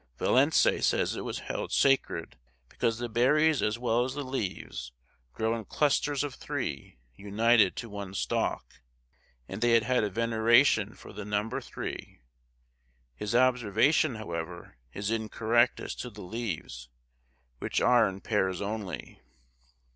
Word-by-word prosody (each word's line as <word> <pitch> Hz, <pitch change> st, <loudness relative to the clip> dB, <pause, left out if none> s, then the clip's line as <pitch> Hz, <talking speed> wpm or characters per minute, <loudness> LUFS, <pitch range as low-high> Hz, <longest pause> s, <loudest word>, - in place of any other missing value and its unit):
Vallancey 140 Hz, +5 st, +3 dB
says -, -, +1 dB
it -, -, -4 dB
was -, -, -4 dB
held -, -, -4 dB
sacred 135 Hz, -1 st, +1 dB, 0.3 s
because 115 Hz, -1 st, -1 dB
the 120 Hz, 0 st, -3 dB
berries 145 Hz, +6 st, +3 dB
as 105 Hz, +2 st, 0 dB
well 120 Hz, 0 st, +1 dB
as 130 Hz, +1 st, -4 dB
the 145 Hz, -, -3 dB
leaves 100 Hz, -, -4 dB, 0.4 s
grow 110 Hz, -, -1 dB
in 115 Hz, -, -5 dB
clusters 145 Hz, +3 st, +1 dB
of 145 Hz, -3 st, -4 dB
three 70 Hz, -, -5 dB, 0.2 s
united 105 Hz, -, +3 dB
to 115 Hz, -, -5 dB
one 100 Hz, -3 st, -7 dB
stalk, -, -, -2 dB, 0.7 s
and 95 Hz, +3 st, -7 dB
they 120 Hz, -1 st, +5 dB
had 125 Hz, +1 st, +1 dB
a 105 Hz, -, 0 dB
veneration 115 Hz, +1 st, +3 dB
for -, -, -13 dB
the 105 Hz, +1 st, -6 dB
number 105 Hz, +2 st, -2 dB
three; -, -, -7 dB, 0.9 s
his 105 Hz, -, -4 dB
observation, 125 Hz, +3 st, +3 dB
however, 85 Hz, -, -6 dB, 0.2 s
is 100 Hz, -, -3 dB
incorrect 115 Hz, +2 st, +1 dB
as -, -, -5 dB
to 125 Hz, -, -6 dB
the 105 Hz, -2 st, -11 dB
leaves, 90 Hz, -, -5 dB, 0.7 s
which -, -, -1 dB
are 120 Hz, -4 st, +4 dB
in 95 Hz, 0 st, -9 dB
pairs 95 Hz, -4 st, 0 dB
only. 100 Hz, -4 st, -5 dB
115 Hz, 140 wpm, -29 LUFS, 100-125 Hz, 0.9 s, they